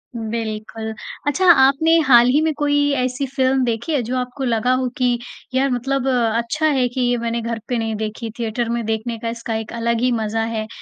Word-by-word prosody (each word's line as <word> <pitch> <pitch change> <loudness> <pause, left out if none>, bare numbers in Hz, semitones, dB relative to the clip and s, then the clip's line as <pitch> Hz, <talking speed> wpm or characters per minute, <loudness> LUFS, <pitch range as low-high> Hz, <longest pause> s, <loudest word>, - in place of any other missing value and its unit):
बिल्कुल। 220 -1 -4 0.3
अच्छा 295 +6 +1
आपने 310 +3 +4
हाल 240 -2 +7
ही 285 +4 +3
में 315 -1 +1
कोई 290 -1 +1 0.2
ऐसी 255 +2 -1
फ़िल्म 265 -1 +2
देखी 235 +7 -2
है 280 - +2
जो 250 +3 -3
आपको 250 +2 -4
लगा 240 0 +1
हो 255 0 0
कि 245 -2 +1 0.3
यार! 270 +1 +2
मतलब 270 +2 -1
अच्छा 235 +4 0
है 265 -5 +3
कि 255 +1 -3
ये 245 0 +2
मैंने 235 0 -2
घर 230 0 -3
पे 245 - -1
नहीं 225 -1 -2
देखी, 220 +1 -4
थिएटर 230 +1 -2
में 235 -1 -2
देखने 225 +1 -2
का 230 - -3
इसका 230 -1 -4
एक 220 0 -5
अलग 235 0 -1
ही 250 0 +2
मज़ा 225 -1 -1
है? 215 0 -3
240 Hz, 205 wpm, -20 LUFS, 225-260 Hz, 0.3 s, हाल